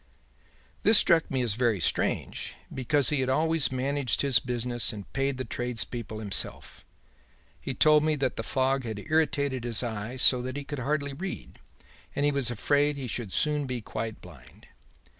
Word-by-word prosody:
"'This 215 +1 +6
struck 165 -5 +4
me 130 -2 0
as 115 -4 +1
very 115 -3 +1
strange, - - -1 0.2
because 135 +2 +3
he 150 - +1
had 130 0 0
always 160 +2 +1
managed 135 0 0
his 135 -4 +4
business 120 -1 -1
and 105 -3 -10
paid 135 0 -1
the 130 - -4
tradespeople 120 -1 -3
himself. 105 -3 -3 0.8
He 135 - -4
told 150 +1 +5
me 155 0 +2
that 135 -4 -1
the - - -3
fog 130 +3 0
had 110 -3 -5
irritated 140 -1 0
his 120 0 0
eye 110 +1 -4
so 125 0 +6
that 130 +2 -5
he 145 - -4
could 145 0 -6
hardly 140 +2 -1
read, 185 +7 -7 0.6
and 145 - +1
he 145 - +3
was 140 -4 0
afraid 145 +5 +1
he 135 - -5
should 115 -3 -4
soon 150 +2 +1
be 125 -1 -3
quite 110 0 -6
blind. 70 -8 -15
130 Hz, 175 wpm, -27 LUFS, 120-145 Hz, 0.8 s, This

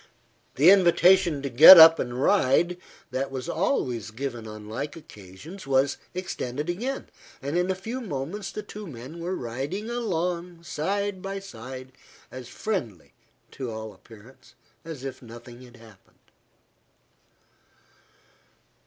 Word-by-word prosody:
The 155 +8 +7
invitation 180 -4 +4
to 140 - -2
get 155 +9 +11
up 160 0 +9
and 120 0 -4
ride, 175 +1 +2 0.3
that 135 +1 -2
was 130 -2 -6
always 130 - -1
given 120 -1 -6
on 105 -1 -10
like 135 +7 -5
occasions, 135 - -12
was 135 +1 +1 0.2
extended 150 -5 -4
again, 250 +9 -4 0.3
and 140 +4 -4
in 180 +1 +1
a 190 - 0
few 225 +7 -6
moments 185 - -5
the 210 - -6
two 210 -1 -9
men 135 +3 -10
were 175 +3 -3
riding 140 - -5
along, 180 -6 -3
side 195 +5 -3
by 195 +1 -5
side, 130 -7 -9 0.4
as 130 -2 -9
friendly, 120 - -5 0.4
to 130 -3 -6
all 110 -1 -7
appearance, 115 +6 -18 0.3
as 155 -5 -9
if 135 -1 -7
nothing 120 +1 -12
had 125 -1 -15
happened. 110 -4 -21
145 Hz, 130 wpm, -25 LUFS, 125-185 Hz, 0.4 s, get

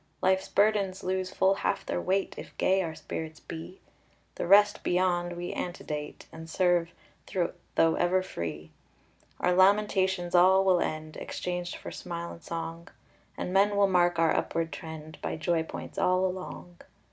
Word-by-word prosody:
Life's 190 0 +2
burdens 200 -2 +2
lose 185 0 -1
full 190 0 +3
half 195 - -1
their - - -2
weight 190 +2 0
If - - -10
gay 190 +1 +3
our 160 -3 -4
spirits 160 -1 -6
be; 165 +3 -9 0.5
The - - -4
rest 205 +2 +6
beyond 175 -1 +1
we 175 0 -5
antedate, 150 -4 -5
And 160 0 -10
serve, 175 -1 +2 0.9
though 165 0 +4
ever 185 +1 +2
free. 80 - -6 0.7
Our 180 - +2
lamentations 190 -2 +3
all 190 +2 +6
will 185 -2 +4
end, 155 0 -3
Exchanged 180 -1 -4
for - - -8
smile 170 -1 -6
and 170 - -11
song, 165 0 -5 0.5
And 180 - -3
men 200 +1 +4
will 200 0 +5
mark 175 -2 +3
our 165 -1 +3
upward 165 -2 -1
trend 155 +1 -8
By - - -3
joy 165 +1 0
points 160 - -7
all 185 +1 +3
along. 185 -1 -6
175 Hz, 155 wpm, -29 LUFS, 165-190 Hz, 0.9 s, rest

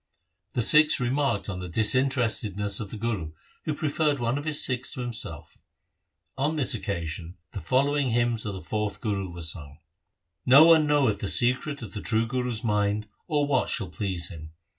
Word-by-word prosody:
The 120 - 0
Sikhs 150 +4 +5
remarked 135 +3 -1
on 95 -3 -5
the 90 -1 -7
dis 105 +4 +6
interestedness 110 -6 +1
of 105 - -6
the 110 - -8
Guru, 105 -8 -4 0.3
who 155 - -2
preferred 150 -1 -1
one 120 +1 -1
of 145 - -9
his 155 -2 +1
Sikhs 125 -2 -1
to 125 - -5
himself. 110 -11 -4 0.8
On 150 +4 0
this 140 -3 +2
occasion 85 -5 -5
the 100 - -7
following 140 +1 0
hymns 120 -1 0
of 100 -2 -5
the 95 - -9
fourth 105 -1 -4
Guru 100 -4 -3
were 85 0 -8
sung: 75 -3 -1 0.4
— 85 -2 -56
No 155 - +9
one 160 -2 +5
knoweth 135 -9 +1
the 100 - -3
secret 130 +3 +1
of 105 - -9
the 105 - -6
true 115 0 0
Guru's 125 -1 -3
mind 105 -1 -1 0.2
or 150 -4 0
what 140 -3 0
shall - - -1
please 95 -6 -3
him. 80 -3 -11
115 Hz, 185 wpm, -25 LUFS, 100-135 Hz, 0.8 s, No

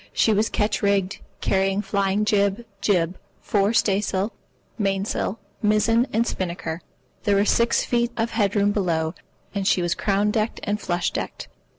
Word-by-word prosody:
She 220 - +3
was 210 +2 +2
ketch 210 0 0
rigged, 200 -1 +1 0.2
carrying 195 +1 +1
flying 200 +1 0
jib, 205 +2 +1 0.2
jib, 180 -3 +1 0.2
fore 200 0 +1
staysail, 200 -1 +1 0.5
main 195 -1 0
sail, 210 0 -2 0.2
mizzen, 225 +3 +3
and 225 +2 +2
spinnaker. 170 -4 -3 0.4
There 205 -2 +2
were 200 +1 +3
six 235 +2 +2
feet 240 0 +1
of 230 0 0
head 205 -2 +1
room 205 0 +3
below, 165 -5 0 0.4
and 200 -2 -1
she 180 - +3
was 175 - +1
crown 205 +1 +1
decked 220 0 -1
and 210 0 -1
flush 175 -1 -1
decked. - - -5
200 Hz, 160 wpm, -23 LUFS, 190-215 Hz, 0.5 s, She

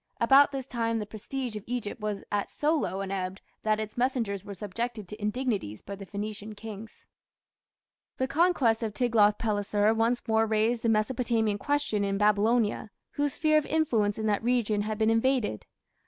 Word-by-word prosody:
About 270 +5 +6
this 270 -2 -4
time 230 -3 -1
the 215 - -3
prestige 230 +3 -5
of 210 - -6
Egypt 235 -3 -4
was 210 -1 -3
at 205 -1 -1
so 300 +2 0
low 195 -10 -2
an 195 -1 -4
ebb 190 -1 -3 0.2
that 215 0 +1
its 215 -1 -5
messengers 240 -6 -1
were 200 -1 -8
subjected 215 +2 -4
to 210 +3 -9
indignities 210 - -2
by 200 - -6
the 195 0 -10
Phoenician 210 +1 -5
kings. 220 0 -9 1.1
The 260 - 0
conquests 275 -8 +2
of 215 -2 -3
Tiglath 220 -4 +3
pileser 210 0 +1
once 230 +2 0
more 220 0 +3
raised 220 +2 +1
the 230 - +1
Mesopotamian 225 -1 +1
question 285 -7 0
in 195 0 0
Babylonia, 210 +2 +2 0.2
whose 290 -1 -1
sphere 310 -1 +4
of 305 - -6
influence 230 -10 +1
in 220 - -3
that 210 -2 +1
region 225 -3 +1
had 215 +1 -3
been 220 0 +3
invaded. 225 - +1
220 Hz, 175 wpm, -28 LUFS, 205-245 Hz, 1.1 s, About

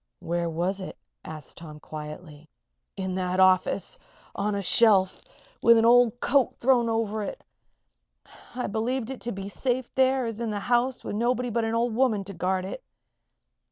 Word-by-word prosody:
"Where 170 0 -2
was 180 +4 -2
it?" 185 - -8 0.3
asked 155 -4 -9
Tom, 155 -2 -10
quietly. 150 0 -9 0.5
"In 190 -1 -3
that 185 0 -2
office 185 0 +2 0.3
on 205 +1 -1
a 200 - -2
shelf, 195 -3 +4 0.4
with 235 0 +6
an 225 - +3
old 245 0 +5
coat 275 -2 +2
thrown 240 -2 +2
over 220 -1 -1
it. 210 - -6 1.1
I 250 - -2
believed 230 +4 -2
it 265 - -8
to 240 - -3
be 195 -2 -6
as 200 - -7
safe 255 -1 -2
there 265 -1 +2
as 230 0 -5
in 230 - -2
the 210 -1 -2
house 245 +4 0
with - - -5
nobody 245 +2 0
but 230 0 0
an 225 0 -1
old 235 0 0
woman 225 -4 +1
to 200 +1 -9
guard 185 +1 -1
it." 350 - -7
220 Hz, 175 wpm, -26 LUFS, 185-240 Hz, 1.1 s, with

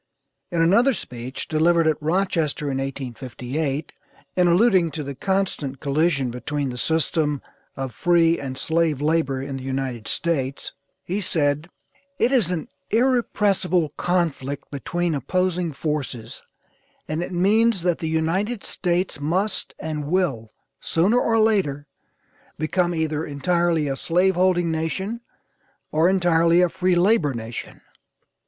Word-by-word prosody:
In 170 -2 +1
another 235 +10 +4
speech, 125 -6 -7
delivered 165 +1 +3
at 155 -1 +1
Rochester 160 -3 0
in 135 - -1
1858, 135 +2 -4 0.4
in 180 -1 +4
alluding 180 -1 +4
to 150 0 -5
the 140 0 -5
constant 160 -5 -2
collision 140 -3 +1
between 140 +3 -3
the 125 - -7
system, 155 -1 +1 0.4
of 135 -3 -4
free 170 -1 +3
and 130 -2 -5
slave 160 0 +1
labor 150 -3 +1
in 135 -1 -5
the 130 - -8
United 130 -4 -3
States, 140 -5 -2 0.3
he 195 +4 -2
said: 150 -2 0 0.5
"It 250 - +2
is 235 - +3
an 170 -4 -3 0.2
irrepressible 210 - +2
conflict 150 -5 -2
between 170 +4 -2
opposing 180 +3 0
forces, 140 -5 -4 0.7
and 155 +2 -2
it 175 - -4
means 200 +2 +3
that 175 -2 +1
the 160 - -2
United 185 +8 -1
States 175 -2 -1
must 185 +7 -1
and 150 -2 -4
will, 145 -11 0 0.3
sooner 195 +9 +2
or 225 -2 +2
later, 195 -11 +2 0.7
become 175 +2 0
either 160 -1 -1
entirely 165 +2 +1
a 135 - -1
slave 180 +6 +2
holding 175 -2 +2
nation, 190 +8 -2 0.7
or 160 +3 +3
entirely 175 -2 +4
a 180 - +4
free 185 0 +1
labor 175 - +3
nation." 115 0 -7
165 Hz, 130 wpm, -23 LUFS, 140-180 Hz, 0.7 s, another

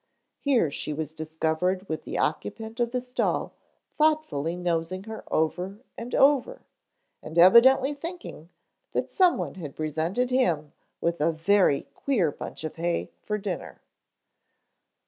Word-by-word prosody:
Here 250 - +2
she 150 - -4
was 155 0 -4
discovered 160 +4 -1
with 160 - -4
the - - -4
occupant 220 +8 -2
of 240 -1 +2
the 250 +1 -1
stall 250 0 -1 0.5
thoughtfully 300 - +1
nosing 175 +1 -2
her 220 +1 -8
over 180 +5 0 0.2
and 235 +2 -5
over 285 - +3 0.6
and 160 +2 -8
evidently 255 +10 +7
thinking 325 - -8 0.4
that - - -1
someone 365 -3 +2
had 145 -4 -7
presented 160 - -1
him 170 - +1 0.3
with 170 -1 -1
a 165 +2 +3
very 165 -2 +3
queer 210 - +1
bunch - - -8
of 155 - -5
hay 170 +1 -1
for 210 - -2
dinner. 195 -4 -5
185 Hz, 130 wpm, -26 LUFS, 160-250 Hz, 0.6 s, evidently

